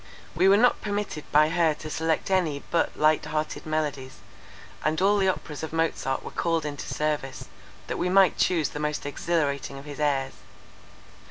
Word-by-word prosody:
We 185 +4 +4
were 200 - +6
not 245 +3 +3
permitted 205 -7 -3
by 155 +1 +5
her 165 -2 +2
to 155 - -8
select 160 +4 -1
any 165 -7 +1
but 170 - +1
light 155 0 +3
hearted 155 0 -3
melodies; 145 -4 -2 0.7
and 155 +2 +1
all 200 +2 +3
the 190 - +2
Operas 160 -5 -3
of 160 - -5
Mozart 160 -4 -1
were - - -7
called 165 -2 0
into 145 -1 -5
service, 150 -3 -2 0.4
that - - -4
we 180 - 0
might 190 0 +5
choose 165 -5 +1
the 150 - -6
most 150 -1 -2
exhilarating 145 -2 -1
of 135 - -10
his 145 -1 -8
airs. 140 -3 0
155 Hz, 175 wpm, -26 LUFS, 145-175 Hz, 0.7 s, were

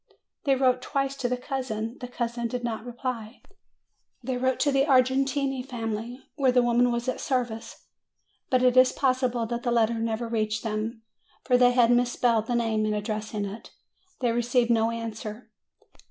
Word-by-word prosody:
They 275 -1 +4
wrote 255 -1 +2
twice 275 -1 -1
to 245 - -1
the 250 - 0
cousin; 245 -3 -4
the 250 - -6
cousin 235 -1 -3
did 245 +1 -4
not 225 -2 -3
reply. 245 -2 -6 0.8
They 255 +1 -2
wrote 260 +1 0
to 290 - +3
the 275 +1 +2
Argentine 270 0 +2
family 235 -1 -5
where 270 -3 +3
the 250 0 +4
woman 240 +1 +3
was 235 +1 -2
at 255 - -2
service; 240 -4 -3 0.6
but 255 -1 +3
it 250 0 +4
is 255 0 +6
possible 255 -3 +1
that 235 +1 -3
the 240 - -1
letter 230 -1 +2
never 225 +1 -2
reached 215 -2 -1
them, 220 +1 -3 0.4
for 250 - +2
they 245 0 +5
had 240 -1 +4
mispelled 240 -2 +2
the 245 - 0
name 225 -2 +1
in 210 - 0
addressing 210 0 -3
it: 200 +3 -9 0.5
they 240 -2 +2
received 240 +1 +1
no 225 -1 +3
answer. 225 -1 -6
240 Hz, 170 wpm, -26 LUFS, 225-255 Hz, 0.8 s, is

